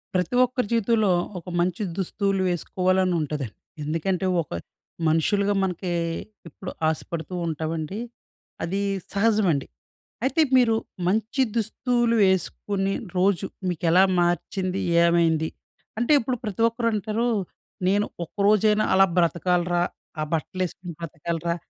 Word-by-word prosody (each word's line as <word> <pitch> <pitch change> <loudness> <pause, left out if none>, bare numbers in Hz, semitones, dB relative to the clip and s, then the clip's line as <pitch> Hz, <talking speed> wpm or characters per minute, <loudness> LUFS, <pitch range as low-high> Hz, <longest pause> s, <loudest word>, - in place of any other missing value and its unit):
ప్రతి 180 +6 0
ఒక్కరి 250 -2 -1
జీవితంలో 225 -2 +2 0.3
ఒక 175 - -10
మంచి 175 +3 0 0.2
దుస్తువులు 195 0 0
వేసుకోవాలని 185 +1 +1
ఉంటుందండి. 145 -7 -3 0.3
ఎందుకంటే 165 +5 -1 0.2
ఒక 160 - -10 0.6
మనుషులుగా 200 +6 +2
మనకి 180 -1 -2 0.6
ఎప్పుడూ 190 - -8 0.2
ఆశపడుతూ 160 +1 -3
ఉంటామండి. 160 +4 -3 0.6
అది 190 +4 -1 0.3
సహజమండి. 200 -8 +2 0.6
అయితే 275 +5 +2 0.2
మీరు 235 -3 +4 0.3
మంచి 220 +7 +1 0.2
దుస్తువులు 240 +1 +1
వేసుకుని, 195 +1 0 0.2
రోజు 195 +1 +2 0.2
మీకు 175 -1 -3
ఎలా 185 +3 +6 0.2
మార్చింది, 185 +2 -1 0.2
ఏమైంది? 165 -2 +3 0.5
అంటే 240 +5 +1
ఇప్పుడు 250 +1 -2
ప్రతి 210 0 -3
ఒక్కరు 230 0 -2
అంటారు 215 +3 -1 0.6
"నేను 205 +2 +3 0.2
ఒక్క - - -31
రోజైనా 215 0 +4
అలా 195 0 +7
బ్రతకాలిరా! 175 0 +2 0.4
ఆ - - +1
బట్టలేసుకొని 180 +2 -3
బ్రతకాలిరా! 170 +1 -3
185 Hz, 110 wpm, -25 LUFS, 170-210 Hz, 0.6 s, అలా